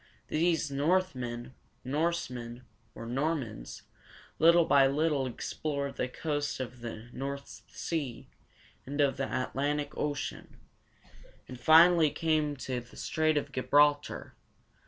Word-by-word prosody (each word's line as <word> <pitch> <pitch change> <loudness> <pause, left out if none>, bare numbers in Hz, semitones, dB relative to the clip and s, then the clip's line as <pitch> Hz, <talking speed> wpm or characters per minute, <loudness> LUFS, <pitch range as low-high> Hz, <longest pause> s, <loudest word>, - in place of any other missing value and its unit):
These 160 -2 +1
Northmen, 135 -6 -1 0.3
Norsemen, 130 -5 -2 0.3
or - - -7
Normans, 130 - -3 0.6
little 170 +1 +6
by 140 -3 +5
little 145 -1 +1
explored 140 +3 -3
the 125 - 0
coast 145 +2 -3
of 130 -1 -6
the 115 0 -7
North 140 +1 -6
Sea, 145 -8 -4 0.6
and 145 +2 -6
of 140 -2 +3
the 135 - -2
Atlantic 145 +3 -1
Ocean, 145 -1 -4 0.9
and 125 - -9
finally 160 +3 +7
came 155 -1 0
to 130 -2 -3
the 120 0 -14
Strait 155 -1 +1
of 145 -1 -2
Gi 130 - -2
bral´tar. 145 +1 +2
145 Hz, 115 wpm, -30 LUFS, 130-155 Hz, 0.9 s, finally